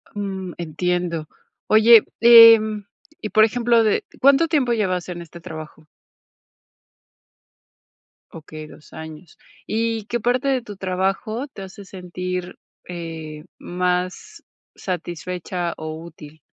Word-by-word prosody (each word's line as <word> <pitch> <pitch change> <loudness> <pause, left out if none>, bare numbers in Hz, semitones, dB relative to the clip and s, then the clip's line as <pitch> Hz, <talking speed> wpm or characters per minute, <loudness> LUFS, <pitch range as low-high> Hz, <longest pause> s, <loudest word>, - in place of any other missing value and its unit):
Mm, 190 -3 -5
entiendo. 170 0 -2 0.4
Oye, 220 +1 +7 0.2
em, 225 -3 +7 0.4
y, 215 - -4
por 215 +1 +5
ejemplo, 235 0 +2
de 215 - +1 0.2
¿cuánto 280 +4 +4
tiempo 280 -7 +1
llevas 185 -5 -1
en 175 -1 -6
este 170 +1 -12
trabajo? 155 -1 -10 2.5
Okey, 155 -1 -10
2 150 - -17
años. 160 +1 -11 0.3
Y, 225 -1 -2
¿qué 240 +2 -3
parte 250 +4 0
de 265 -2 +1
tu 210 -4 -11
trabajo 195 +7 -2
te 200 -8 -11
hace 190 +1 -11
sentir, 180 -1 -6 0.3
eh, 160 -3 -7 0.2
más 180 - -3 0.3
satisfecha 175 0 -5
o 155 0 -6
útil? 155 -2 -13
185 Hz, 115 wpm, -21 LUFS, 170-225 Hz, 2.5 s, Oye